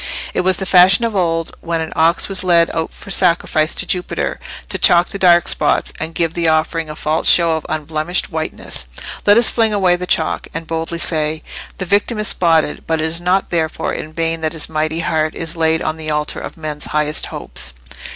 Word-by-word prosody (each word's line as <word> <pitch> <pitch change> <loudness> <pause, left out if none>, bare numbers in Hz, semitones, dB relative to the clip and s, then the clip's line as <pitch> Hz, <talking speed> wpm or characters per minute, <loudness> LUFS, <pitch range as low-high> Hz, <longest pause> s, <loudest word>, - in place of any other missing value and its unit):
It - - +1
was 185 0 +2
the 190 - -3
fashion 185 +4 +5
of 225 -2 -3
old, 165 -3 -1
when 170 -1 -2
an 160 0 -4
ox 165 +2 +2
was 195 -1 -2
led 170 -2 +3
out 160 0 -2
for 195 - -10
sacrifice 170 -4 +2
to - - 0
Jupiter, 180 -1 -2 0.3
to - - -1
chalk 175 0 +5
the 200 - -6
dark 175 -2 +5
spots, - - +1
and 160 +1 -5
give 165 -1 0
the 170 -1 -1
offering 160 0 0
a 150 - -6
false 155 +1 +2
show 170 -2 +5
of 160 - -5
unblemished 155 +4 -2
whiteness. 155 - -5 0.4
Let 205 +1 +7
us 235 - +4
fling 225 -2 +2
away 185 -3 +3
the 180 0 -5
chalk, 160 - 0
and 165 0 -4
boldly 165 +1 -4
say,—the 160 +3 -3
victim 205 +5 +1
is 215 0 -2
spotted, 165 -3 +1
but 160 -1 0
it 155 - 0
is 165 +1 0
not 185 +2 0
therefore 160 -2 -1
in 155 - -6
vain 165 0 -2
that 155 0 -2
his 160 - -4
mighty 155 +1 -2
heart 155 -2 -1
is 165 0 -5
laid 160 0 +1
on 155 - -2
the 155 -1 -6
altar 150 0 -1
of - - -8
men's 155 -2 -5
highest 150 0 -1
hopes. 65 - -4
165 Hz, 210 wpm, -17 LUFS, 155-180 Hz, 0.4 s, Let